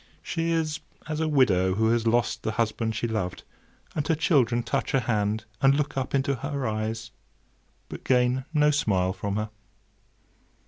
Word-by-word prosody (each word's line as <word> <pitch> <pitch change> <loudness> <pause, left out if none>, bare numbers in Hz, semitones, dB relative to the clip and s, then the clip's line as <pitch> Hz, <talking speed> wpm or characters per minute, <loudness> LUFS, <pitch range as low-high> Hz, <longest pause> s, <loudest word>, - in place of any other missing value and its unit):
She 165 -1 -2
is 160 -2 0 0.3
as 155 -1 -3
a 160 - +1
widow 95 -11 +3
who 110 +2 +2
has 115 -1 +1
lost 120 +1 +1
the 110 - -2
husband 110 0 -1
she 120 - -1
loved, 105 -6 -3 0.5
and 150 -1 -2
her 165 - +3
children 130 -7 +2
touch - - -2
her 135 - +3
hand, 110 -1 0 0.2
and 135 0 +5
look 150 0 -1
up 135 0 -1
into 140 +1 +1
her 140 0 -3
eyes, 110 +1 -3 0.8
but - - -8
gain 125 0 +2
no 150 -1 +4
smile 95 -10 +1
from 100 +1 -3
her. 105 0 -2
120 Hz, 170 wpm, -26 LUFS, 110-140 Hz, 0.8 s, and